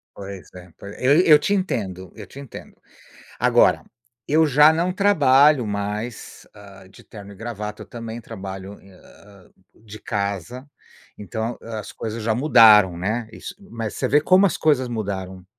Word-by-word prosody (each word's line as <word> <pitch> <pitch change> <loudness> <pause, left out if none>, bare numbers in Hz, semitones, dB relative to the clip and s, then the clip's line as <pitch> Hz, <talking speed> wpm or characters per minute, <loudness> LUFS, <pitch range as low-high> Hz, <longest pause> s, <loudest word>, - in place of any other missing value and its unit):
Pois 100 -1 -10
é, 90 -1 -13
pois 100 +1 -11
eu 140 +6 +4
eu 155 -4 +6
te 200 - -1
entendo, 95 - -4
eu - - -10
te - - -14
entendo. 140 - -12 0.6
Agora - - +3 0.4
eu 155 +2 +3
já 150 +2 +6
não 170 +3 -1
trabalho 145 - +3
mais, 105 +3 -6
hã, 100 -2 -15
de 95 - -18
terno 100 -2 -12
e - - -16
gravata, 105 -1 -7
eu - - -9
também 115 +3 -8
trabalho 95 -2 -9
em 100 - -19
hã, 100 +1 -20 0.2
de 110 -1 -13
casa, 100 - -5 0.5
então 110 +3 -5
as 110 -2 -8
coisas 110 0 -6
já 110 - 0
mudaram, 110 - +5
né, 110 +6 -3
isso - - -9
mas 115 - -7
você - - -2
vê 145 +2 +3
como 185 +5 +4
as 175 - 0
coisas 145 -5 +1
mudaram, 95 -5 -6
110 Hz, 160 wpm, -21 LUFS, 100-135 Hz, 0.6 s, eu